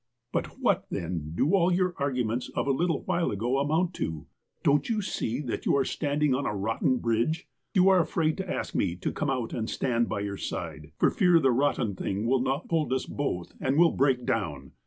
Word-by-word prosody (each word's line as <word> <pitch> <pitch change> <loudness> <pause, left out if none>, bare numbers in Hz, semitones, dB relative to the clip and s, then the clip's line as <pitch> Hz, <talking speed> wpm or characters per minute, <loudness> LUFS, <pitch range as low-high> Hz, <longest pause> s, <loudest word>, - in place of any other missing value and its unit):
''But - - 0
what, - - +1
then, 80 -3 -4
do 150 - +2
all 185 -2 +4
your 180 0 +1
arguments 125 -3 -1
of - - 0
a 140 - +2
little 165 +2 0
while 170 - 0
ago 120 +6 0
amount 160 +5 +1
to? 80 -3 -3 0.4
Don't 145 +8 +3
you 225 -2 +1
see 130 - -2
that 125 -6 -4
you - - +4
are 135 - +2
stand 145 +1 -1
ing 145 -3 +4
on 135 +2 0
a 105 - -2
rotten 115 +5 +1
bridge'? 120 - 0 0.3
You 185 0 +5
are 190 -1 +6
afraid 160 -2 +1
to 190 -2 -4
ask - - -3
me 90 -3 0
to 90 - -3
come 150 - -2
out 125 -4 -2
and 110 -1 -2
stand 120 -2 0
by 100 - -2
your 100 -1 -3
side, 80 -4 -5
for - - +3
fear 180 -4 +4
the 135 -4 +3
rotten 125 -4 +1
thing 100 +3 -2
will 130 +2 +2
not 135 +4 -1
hold 160 -5 0
us 130 0 0
both, 90 -12 -3
but 135 0 0
will 170 0 +6
break 130 -3 +1
down. 75 -11 -2
130 Hz, 220 wpm, -28 LUFS, 110-155 Hz, 0.4 s, are